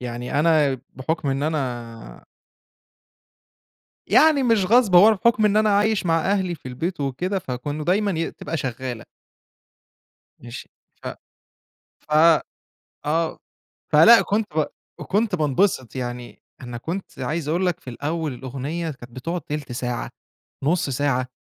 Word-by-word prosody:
يعني 125 +3 -3
أنا 150 -5 +3 0.2
بحُكم 145 +2 -2
إن 135 +1 -1
أنا 120 - -4 1.8
يعني 305 -3 +5
مش 225 -6 +3
غصب 220 -4 +4
هو 190 +4 +9
أنا 220 - +5
بحُكم 220 +2 +2
إن 210 0 +3
أنا 215 0 +3
عايش 210 -2 +1
مع 165 -1 +2
أهلي 185 -4 0
في 130 - -12
البيت 165 +7 -4
وكده 175 +9 -2
فكانوا 145 +1 -5
دايمًا 200 +3 +2
ي 165 - -1
بتبقى 165 +2 -5
شغّالة. 125 -3 -5 1.3
ماشي، 120 +1 -9 0.3
ف - - -4 0.9
ف - - -21 0.9
آه، 160 +2 0 0.5
فلأ 220 +10 +8
كنت 210 +1 0
ب 155 - +3 0.3
وكنت 205 -1 0
بانبسط 150 - 0
يعني، 120 -1 -6 0.2
أنا 120 -1 -7
كنت 165 +3 -6
عايز 150 +4 -3
أقول 175 +4 0
لك 180 - 0
في - - -10
الاول 150 +4 -3
الأغنية 135 +6 -4
كانت 120 -3 -12
بتقعد 165 +8 -4
تِلت 145 -2 -5
ساعة، 120 0 -3 0.5
نُص 170 +1 +1
ساعة 130 -1 0
150 Hz, 135 wpm, -23 LUFS, 130-185 Hz, 1.8 s, هو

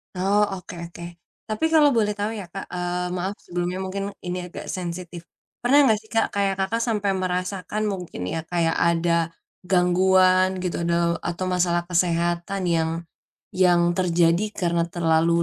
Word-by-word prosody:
Oh, 200 +3 +2 0.2
oke 180 - -10 0.2
oke. 170 - -10 0.4
Tapi 215 +8 -1
kalau 300 -2 +6
boleh 210 -2 +2
tahu 210 +2 -3
iya 200 -3 -6
Kak, 195 - -6
eee, 180 0 -2
maaf 190 +3 -2
sebelumnya 175 +1 -3
mungkin 195 +1 -3 0.2
ini 180 +1 -2
agak - - -9
sensitif. 175 -2 -5 0.4
Pernah 275 +2 +5
enggak 215 -1 +3
sih 220 - -21
Kak, 225 - +2
kayak 195 -1 0
Kakak 225 +5 0
sampai 210 -4 0
merasakan 185 +3 -2
mungkin 180 - -4
ya, 160 -1 -3
kayak 165 -1 0
ada 170 0 +2 0.3
gangguan 185 +1 +3
gitu 180 -1 -2
dau 170 0 +1
atau 175 +2 -3
masalah 175 -1 +1
kesehatan 175 +2 0
yang 165 -1 +1 0.6
yang 180 -2 +4 0.2
terjadi 170 +1 +3
karena 170 -2 0
terlalu 170 0 +2
180 Hz, 150 wpm, -24 LUFS, 170-195 Hz, 0.6 s, kalau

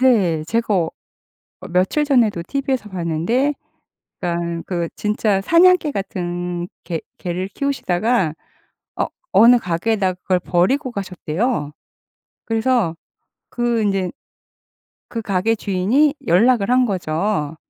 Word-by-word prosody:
네. 195 -12 +3
제가 225 +4 0
어 165 -3 0 0.8
며칠 190 +12 +2
전에도 235 - +2
티브이에서 265 -5 -2
봤는데 185 - 0 0.7
그러니깐 170 -1 -2
그 170 -2 -2
진짜 210 -1 +1
사냥개 335 - +4
같은 175 -3 -3 0.2
개 165 -3 -3 0.2
개를 180 +1 -3
키우시다가 215 - 0 0.6
어 - - 0 0.3
어느 235 +5 +7
가게에다가 190 0 0
그걸 185 -1 +1
버리고 250 +11 +1
가셨대요. 185 - -2 0.7
그래서 225 -7 +1 0.5
그 240 -2 0
인제 195 -3 0 1.0
그 230 - -4
가게 205 +2 +1
주인이 215 +10 +2
연락을 210 +4 +4
한 250 0 +4
거죠. 170 -4 -1
200 Hz, 245 characters per minute, -20 LUFS, 175-240 Hz, 1.0 s, 어느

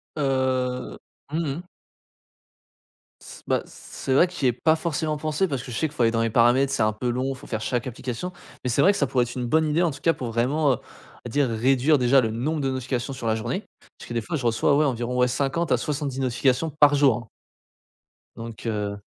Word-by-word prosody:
Heu, 130 -3 -1 0.3
mmh 160 - -1 0.2
mh. - - -6 1.6
S - - -12
bah, - - +1
c'est 135 - -5
vrai 170 +7 +5
que 180 - -13
j'y 140 -7 0
ai 125 - +3
pas 155 +6 +2
forcément 155 -2 -2
pensé 155 +5 0
parce 135 -3 -2
que 125 - -8
je - - -4
sais 160 - +1
qu'il 145 - -17
faut 120 - +1
aller 115 - +4
dans 115 0 0
les 115 - +1
paramètres, 120 +4 +4
c'est - - +1
un 110 0 +2
peu 120 +3 -3
long, 130 +3 -1
faut - - -13
faire 110 - -3
chaque 120 0 -1
application, 130 +7 -5 0.3
mais 125 - -1
c'est 130 +4 +2
vrai 190 - +6
que - - -3
ça 140 - +1
pourrait 125 -1 +2
être 120 - -8
une 125 -1 -2
bonne 160 +6 +2
idée 155 +3 +1
en 170 - +2
tout 140 - -9
cas 165 - +3
pour 120 -6 -5
vraiment, 135 +5 +2
heu, - - 0
on - - -18
va - - -5
dire 135 +1 +1
réduire 130 +6 +3
déjà 130 +1 +4
le 115 - 0
nombre 145 +7 -2
de 135 - 0
notifications 130 0 -3
sur 130 -3 -5
la 110 - +2
journée, 120 - -3 0.3
parce - - -11
que - - -6
des 115 - 0
fois 160 +8 -3
je 130 - -5
reçois 115 +4 +3
ouais 155 - +3
environ 125 -2 -1
ouais 125 0 +4
50 140 +5 -1
à - - +4
70 140 0 -3
notifications 130 +4 +1
par 145 -1 +6
jour 140 -5 +4
hein. 115 -3 -10 1.1
Donc 115 0 -8
heu 105 -2 -2
130 Hz, 240 wpm, -24 LUFS, 120-145 Hz, 1.6 s, vrai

